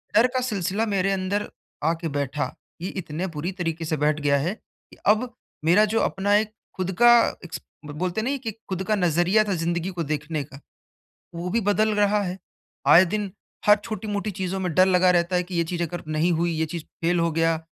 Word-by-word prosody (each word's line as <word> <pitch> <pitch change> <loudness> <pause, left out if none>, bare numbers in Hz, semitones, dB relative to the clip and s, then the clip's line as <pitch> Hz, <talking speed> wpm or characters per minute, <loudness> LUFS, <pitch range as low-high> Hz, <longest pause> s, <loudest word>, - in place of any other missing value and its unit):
डर 240 - +6
का 255 - +3
सिलसिला 210 -3 -1
मेरे 195 -2 +1
अंदर 195 +2 -1 0.4
आके 165 +1 0
बैठा, 145 +1 -2 0.3
ये 185 - -3
इतने 175 -1 -4
बुरी 170 +5 -2
तरीके 165 -1 -2
से 155 0 -1
बैठ 150 +1 +1
गया 140 -1 +3
है 165 +8 -1
कि - - -24
अब 225 +4 +3 0.3
मेरा 180 +6 +6
जो 225 - +3
अपना 200 +1 +1
एक 215 +1 +1 0.2
खुद 185 0 -1
का 240 0 +9 0.3
इक्स 160 -1 -7 0.2
ब 150 - -7
बोलते 185 +4 -1
हैं 225 - -3
ना 280 - 0
कि 235 -4 -5 0.2
खुद 190 0 -2
का 215 - +3
नज़रिया 180 +3 +3
था 200 - -1
ज़िंदगी 170 +1 -1
को 175 -2 -3
देखने 150 +1 -2
का, 140 0 -13 0.8
वो 170 +2 -4
भी 230 +5 +1
बदल 215 +2 +2
रहा 205 0 +3
है। 185 -1 -3 0.5
आए 180 +3 +8
दिन 205 +1 -2 0.4
हर 210 - +9
छोटी-मोटी 215 -2 -3
चीज़ों 190 +1 -2
में 180 -4 -2
डर 185 - +6
लगा 185 -1 +4
रहता 175 +1 +1
है 180 - +2
कि 180 0 -7
ये 170 - +2
चीज़ 175 +1 -3
अगर 175 +1 -5
नहीं 155 +3 +1
हुई, 170 +1 +1
ये 160 0 0
चीज़ 160 0 -6 0.2
फेल 175 +1 +2
हो 170 -1 +1
गया, 165 0 +2
180 Hz, 215 wpm, -24 LUFS, 165-205 Hz, 0.8 s, का